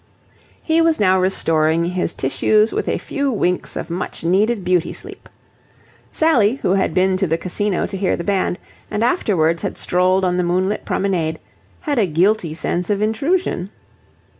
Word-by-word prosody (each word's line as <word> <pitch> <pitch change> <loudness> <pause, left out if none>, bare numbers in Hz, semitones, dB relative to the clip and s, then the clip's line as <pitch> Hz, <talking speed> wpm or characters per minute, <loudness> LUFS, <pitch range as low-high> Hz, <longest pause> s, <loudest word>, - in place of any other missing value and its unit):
He 325 0 +2
was 330 -1 +2
now 190 -2 +3
restoring 165 -2 +1
his 180 -2 -1
tissues 215 +11 +1
with - - -2
a - - 0
few 280 -2 -2
winks 180 -5 -1
of 170 - -5
much 175 -1 -5
needed 200 +5 +1
beauty 180 -2 +1
sleep. - - -12 0.8
Sally, 255 -9 +3
who - - +2
had 190 -4 0
been 185 0 +2
to 190 0 0
the 165 +1 0
Casino 190 +2 -2
to - - -6
hear 190 -1 0
the 170 - -5
band 190 -1 0 0.3
and 210 - -1
afterwards 175 - +1
had 200 - -4
strolled 185 +1 +1
on 180 0 0
the 180 - +1
moonlit 185 +4 -1
promenade, 170 -5 -1 0.4
had 290 -6 -1
a 205 - +2
guilty 175 0 +1
sense 175 +2 -2
of 205 -1 +1
intrusion. 220 - -1
185 Hz, 165 wpm, -19 LUFS, 175-215 Hz, 0.8 s, now